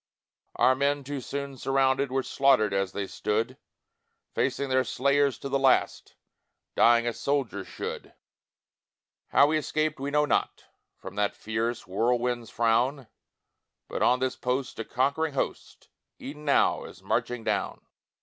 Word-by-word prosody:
"Our 130 - +4
men, 140 +2 0
too 140 0 -5
soon 140 +1 -5
surrounded, 135 0 +1
Were 135 0 0
slaughtered 130 -8 +3
as 95 -1 0
they 100 - -3
stood, 110 +6 -2 0.8
Facing 135 +1 -1
their 130 0 +3
slayers 140 0 +1
to - - -6
the 140 0 0
last, 135 -1 +1 0.6
Dying 120 0 +5
as 120 -1 -3
soldiers 130 -9 -1
should. - - -7 1.1
How - - +5
we 155 +1 +2
escaped 155 0 -1
we 140 +1 -3
know 150 +1 +2
not, - - -1 0.3
From - - -9
that 105 0 0
fierce 115 +2 -3
whirlwind's 120 +3 0
frown, 120 +4 +1 0.8
But - - -4
on 125 +1 +4
this 130 0 -1
post 125 0 -3
a 115 - -3
conquering 140 +4 0
host - - -4 0.3
E'en 150 +2 -9
now 140 - +3
is - - -13
marching 125 -2 -1
down!" - - -2
130 Hz, 140 wpm, -27 LUFS, 120-140 Hz, 1.1 s, Dying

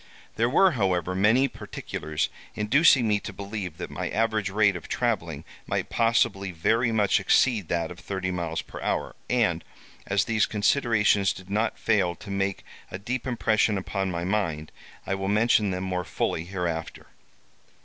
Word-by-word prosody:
There 115 +2 +2
were, 185 +7 +5
however, 95 - 0
many 110 +8 +4
particulars 80 - -4 0.3
inducing 130 +3 +4
me 105 -1 +2
to 100 - -7
believe 100 -3 -6
that - - -6
my - - -3
average 110 -2 0
rate 100 0 +3
of 90 - -7
travelling - - -1 0.2
might - - -2
possibly 115 -4 +2
very 115 +8 +1
much 105 -3 +3
exceed 105 0 +2
that 85 0 -1
of 90 - -10
thirty 95 0 -3
miles 85 -3 -3
per - - -10
hour, - - -2
and, - - +1 0.4
as 100 -1 +2
these 110 -2 +2
considerations 105 -3 +2
did 95 +1 -12
not 110 +2 0
fail 95 -6 +1
to 100 - -10
make 100 0 -2 0.2
a - - -5
deep 125 +6 -4
impression 110 -3 +1
upon 95 0 -2
my 85 -1 -3
mind, 85 -6 -1 0.3
I - - -1
will 95 0 -2
mention 105 0 +3
them 90 0 -3
more 90 -1 -2
fully 80 -1 -2
hereafter. 85 -3 -4
100 Hz, 160 wpm, -26 LUFS, 90-110 Hz, 0.4 s, were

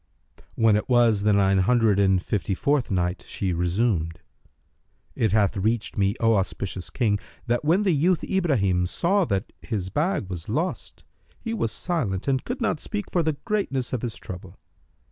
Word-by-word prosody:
When 110 -2 +4
it 105 - -1
was 120 -4 +4
the 105 +1 +3
Nine 100 -1 +3
Hundred 110 0 +3
and 95 -2 +4
Fifty 95 +1 -2
fourth 140 +4 +1
Night, 90 -1 -1
She 95 -3 -2
resumed, 85 -1 0 0.9
It 110 -4 +1
hath 105 -2 +2
reached 110 +3 -1
me, 100 0 +1
O 115 -2 +3
auspicious 95 -2 -3
King, 105 -1 0 0.3
that 120 +1 0
when 170 +7 +3
the 195 - +3
youth 165 +3 +2
Ibrahim 105 - +1
saw 190 - +1
that 100 -4 -2
his 95 -5 -4
bag 155 - 0
was 90 -2 -7
lost, 160 - -3 0.4
he 230 - -4
was 115 - -1
silent 120 - -2
and 135 -1 +1
could 250 +2 -5
not 220 -9 0
speak 205 +3 -5
for 175 - +2
the 160 -1 0
greatness 165 - -1
of 125 - -1
his 120 -3 -4
trouble. 90 0 -9
110 Hz, 170 wpm, -25 LUFS, 95-150 Hz, 0.9 s, When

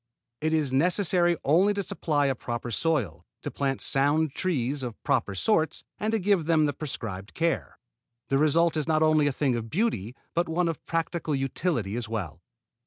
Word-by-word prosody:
It 155 +1 0
is 150 -5 +1
necessary 175 +3 +2
only 185 +8 +3
to 200 - -1
supply 150 -5 0
a 135 - +2
proper 120 -1 -5
soil, 115 - -1 0.2
to - - -4
plant 135 -1 -2
sound 145 +2 +2
trees 145 -6 -1
of 120 -3 -5
proper 100 - 0
sorts, 160 - +1 0.2
and 215 +1 0
to 225 - +2
give 195 -4 +2
them 160 -2 +3
the 145 - 0
prescribed 105 -9 -6
care. 165 - -1 0.5
The 135 - +2
result 165 +3 +3
is 155 -1 -1
not 155 -1 +3
only 155 -2 +4
a - - +2
thing 135 -1 0
of 115 -1 -4
beauty 125 - -1 0.2
but 170 0 0
one 170 +2 +1
of 165 -3 -4
practical 165 -2 -1
utility 135 - -1
as 120 -2 -4
well. 90 -8 -4
150 Hz, 180 wpm, -27 LUFS, 125-170 Hz, 0.5 s, only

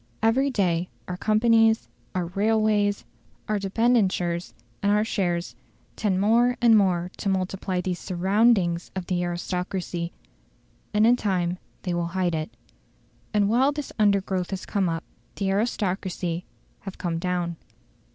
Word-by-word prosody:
Every 260 +5 +3
day 180 -7 0 0.2
our 180 - -3
companies, 225 +2 +3 0.3
our 180 -1 0
railways, 205 +2 +1 0.4
our 215 -1 0
debentures, 195 -5 +1 0.3
and 200 - +2
our 210 +1 +3
shares, 175 -5 -1 0.4
tend 195 -4 0
more 235 +4 +3
and 235 -2 +6
more 180 -3 +2
to 200 - -2
multiply 185 -1 -1
these 180 -1 -3
SURROUNDINGS 190 -1 +2
of 190 -2 -3
the 175 0 -1
aristocracy, 175 0 -3 0.8
and 210 +1 +3
in 240 +2 +5
time 180 -5 -1 0.2
they 180 - -2
will 170 0 -1
hide 180 -2 +1
it. 155 -1 -2 0.8
And 205 -2 +2
while 255 +6 +3
this 295 -1 -5
undergrowth 195 -3 +2
has 195 -1 -4
come 195 -4 0
up, 165 0 -3 0.3
the 195 -1 -1
aristocracy 190 -4 -1 0.3
have 195 -1 -8
come 165 -2 -2
down. 175 -1 -2
190 Hz, 135 wpm, -25 LUFS, 175-215 Hz, 0.8 s, and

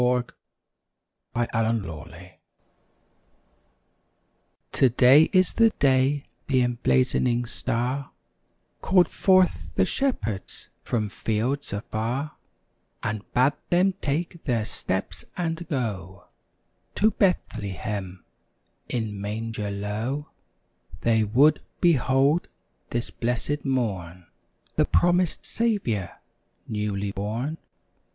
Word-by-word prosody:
THE 125 0 +2 1.1
FULFILLED 115 -2 0
PROPHESY 85 +2 -10 2.3
Today 130 +4 +6
is 185 -2 +3
the 230 0 +5
day 135 +1 +3 0.2
the 130 -3 +3
emblazoning 125 0 +1
Star 125 +3 -2 0.7
Called 180 -3 +4
forth 185 0 +2
the - - +3
shepherds 115 - -2
from 110 -3 -1
fields 115 +8 -2
afar 115 +8 -3 0.7
And 105 -1 -4
bade 130 +3 +4 0.2
them 185 +2 +3
take 165 +3 -2
their 115 -6 0
steps 95 -4 -3
and 170 -1 -2
go 100 - -3 0.7
To 215 +2 +4
Bethlehem, 100 - -2 0.6
in 110 -4 -3
manger 105 0 -3
low 110 +8 -3 0.7
They 110 -1 +3
would 130 +9 +4 0.2
behold, 140 -1 +3 0.4
this 120 0 -2
blessed 125 +5 -2
morn, 95 -10 -2 0.5
The - - +4
promised 175 0 +2
Saviour, 195 - -1 0.5
newly 105 -2 -2
born. 115 +10 -3
120 Hz, 85 wpm, -25 LUFS, 105-145 Hz, 2.3 s, Today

